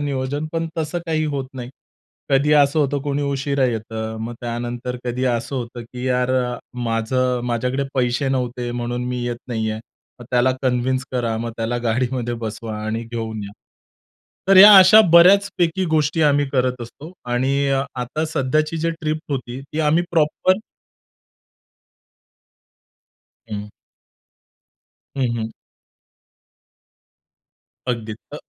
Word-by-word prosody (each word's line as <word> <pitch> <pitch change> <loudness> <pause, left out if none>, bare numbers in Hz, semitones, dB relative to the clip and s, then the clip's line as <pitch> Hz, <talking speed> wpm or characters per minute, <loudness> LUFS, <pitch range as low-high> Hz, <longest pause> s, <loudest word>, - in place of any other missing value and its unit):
नियोजन. 140 +1 -2
पण 165 0 -1
तसं 160 +2 -2
काही 155 -1 0
होत 135 -1 -3
नाही. 125 -1 -7 0.6
कधी 140 +2 +3
असं 145 +1 +4
होतं 145 -1 +1
कोणी 145 0 -1
उशिरा 140 -1 0
येतं. 110 -1 -3
मग 120 +1 -5
त्यानंतर 120 +1 -4
कधी 125 +1 -2
असं 125 +2 -1
होतं 120 -1 -5
की 125 +2 -8
"यार 125 0 +1
अ, 125 -1 0 0.3
माझं 125 +2 0
माझ्याकडे 125 +3 -1
पैसे 130 +1 +1
नव्हते 125 -2 -2
म्हणून 120 0 -3
मी 125 -1 -3
येत 120 -1 -2
नाहीये." 110 -2 -2 0.4
मग - - -9
त्याला 125 +1 +3
कन्व्हिन्स 130 0 0
करा 120 -3 -1
मग 115 +1 -3
त्याला 115 +1 -2
गाडीमध्ये 120 +1 -1
बसवा 110 -1 -5
आणि 110 +1 -2
घेऊन 110 -2 -5
या. 100 - -9 1.0
तर 195 - +6
या 205 +3 +11
अशा 190 +4 +9
बऱ्याचपैकी 185 0 +5
गोष्टी 155 +1 +1
आम्ही 145 -1 +3
करत 125 -1 0
असतो. 145 +8 -11 0.2
आणि 135 +3 +1
अ, 135 0 +2 0.2
आता 140 +6 -2
सध्याची 155 +2 0
जी 165 +1 0
ट्रिप 155 -1 -3
होती 130 -1 -4
ती 145 +3 -5
आम्ही 155 +2 +3
प्रॉपर 170 +3 +2 2.9
हं. 105 0 -5 1.5
हं, 130 -3 +1
हं. 110 -1 -3 2.4
अगदी 115 -3 -2 0.2
अ - - -5
130 Hz, 130 wpm, -21 LUFS, 120-145 Hz, 2.9 s, या